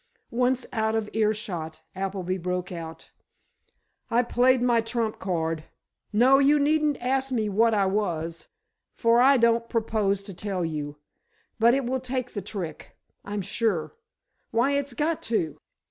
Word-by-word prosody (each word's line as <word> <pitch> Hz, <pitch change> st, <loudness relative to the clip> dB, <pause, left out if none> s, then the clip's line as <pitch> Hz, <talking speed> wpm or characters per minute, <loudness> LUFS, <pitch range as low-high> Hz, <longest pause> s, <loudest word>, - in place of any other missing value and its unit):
Once 250 Hz, +2 st, +1 dB
out 220 Hz, -1 st, 0 dB
of 220 Hz, -2 st, -2 dB
earshot, 210 Hz, -7 st, -2 dB
Appleby 190 Hz, -1 st, -2 dB
broke 180 Hz, +1 st, -3 dB
out: 165 Hz, -2 st, -8 dB, 1.0 s
"I 240 Hz, +2 st, +3 dB
played 250 Hz, +2 st, +3 dB
my 240 Hz, -2 st, +3 dB
trump 225 Hz, -1 st, -2 dB
card! 165 Hz, -3 st, -2 dB, 0.5 s
No, 250 Hz, +6 st, +5 dB
you 285 Hz, +2 st, +5 dB
needn't 300 Hz, 0 st, +2 dB
ask 265 Hz, +2 st, 0 dB
me 220 Hz, -4 st, 0 dB
what 225 Hz, +3 st, +3 dB
I 200 Hz, -2 st, +3 dB
was, 170 Hz, -5 st, -2 dB, 0.5 s
for 235 Hz, 0 st, +4 dB
I 270 Hz, +2 st, +6 dB
don't 235 Hz, 0 st, +2 dB
propose 215 Hz, -4 st, 0 dB
to 195 Hz, -1 st, -8 dB
tell 185 Hz, -1 st, -3 dB
you. 150 Hz, -2 st, -4 dB, 0.6 s
But 235 Hz, +3 st, +5 dB
it 270 Hz, -2 st, -1 dB
will 260 Hz, +2 st, -1 dB
take 255 Hz, -1 st, -4 dB
the 205 Hz, -, -3 dB
trick, 185 Hz, -6 st, -7 dB, 0.3 s
I'm 205 Hz, 0 st, -4 dB
sure. 200 Hz, -4 st, -1 dB, 0.6 s
Why, 240 Hz, +5 st, +2 dB
it's 280 Hz, -2 st, -1 dB
got 305 Hz, +6 st, -1 dB
to!" 170 Hz, -9 st, -1 dB
220 Hz, 145 wpm, -26 LUFS, 185-250 Hz, 1.0 s, I